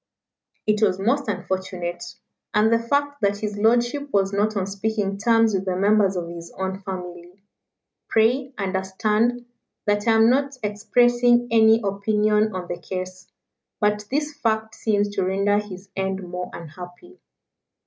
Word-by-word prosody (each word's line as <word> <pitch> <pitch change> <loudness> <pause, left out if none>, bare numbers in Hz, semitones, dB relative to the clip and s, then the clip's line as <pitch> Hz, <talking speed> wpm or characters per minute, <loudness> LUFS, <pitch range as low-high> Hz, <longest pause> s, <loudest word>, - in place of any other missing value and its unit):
"It 215 0 +1
was 190 -4 +3
most 240 +8 0
unfortunate. 185 -2 -3 0.5
And 215 +2 +4
the 230 - +4
fact 285 +4 -1
that 200 0 +1
his 210 0 -4
lordship 240 +6 +2
was 195 -1 +1
not 210 +1 +1
on 190 - 0
speaking 200 0 -2
terms 225 0 +3
with 190 0 -1
the 185 -1 -1
members 200 0 +3
of 175 -2 -3
his 170 0 -9
own 190 0 -3
family 180 -1 -8 0.7
pray 250 +4 +2
understand 210 +5 0 0.4
that 205 +1 0
I 225 - +5
am 225 0 +5
not 275 +2 +1
expressing 240 +3 +3
any 225 0 +5
opinion 210 +1 +1
on 180 -1 -5
the 175 - -5
case 185 +1 -6 0.5
but 210 0 +1
this 295 +2 -1
fact 220 -5 -1
seems 205 -2 0
to 200 -2 -2
render 200 +2 +1
his 200 -2 -9
end 190 -1 -3
more 180 +1 -5
unhappy." 180 - -11
205 Hz, 150 wpm, -23 LUFS, 190-225 Hz, 0.7 s, I